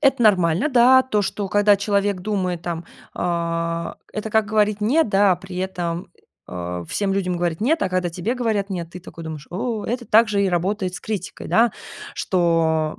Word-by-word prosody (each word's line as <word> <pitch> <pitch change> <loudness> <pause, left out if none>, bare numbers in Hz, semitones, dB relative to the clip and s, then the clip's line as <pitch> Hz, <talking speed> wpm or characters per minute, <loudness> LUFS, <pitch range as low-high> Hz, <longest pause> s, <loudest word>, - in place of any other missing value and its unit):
это 270 -4 +3
нормально, 185 - +3
да. 255 0 +6
То, 215 -5 0
что 200 0 -3
когда 205 +1 +4
человек 200 -1 0
думает, 185 -4 -2
там, 170 -1 -4 0.3
э, 170 -1 -2 0.2
это 215 +1 -4
как 220 -1 +2
говорить 210 -1 +1
"нет", 250 +6 +2
да, 195 -1 +4
а - - 0
при 190 +1 -10
этом, 180 -2 -3 0.4
о 90 -1 -5
всем 195 - -1
людям 180 -2 -1
говорить 170 -1 -1
"нет", 305 +8 +2
а - - +1
когда 185 -1 -1
тебе 185 +9 -2
говорят 215 -5 -1
"нет", 170 -3 -4
ты 180 - -9
такой 165 -2 -10
думаешь: 155 -3 -7
о. 215 +3 -3
Это 240 +1 -2
также 215 -2 +4
и 195 - +2
работает 185 +1 -1
с - - -6
критикой, 205 -5 -5
да. 230 -1 +4 0.4
Что 165 -3 +1
195 Hz, 185 wpm, -22 LUFS, 170-215 Hz, 0.4 s, да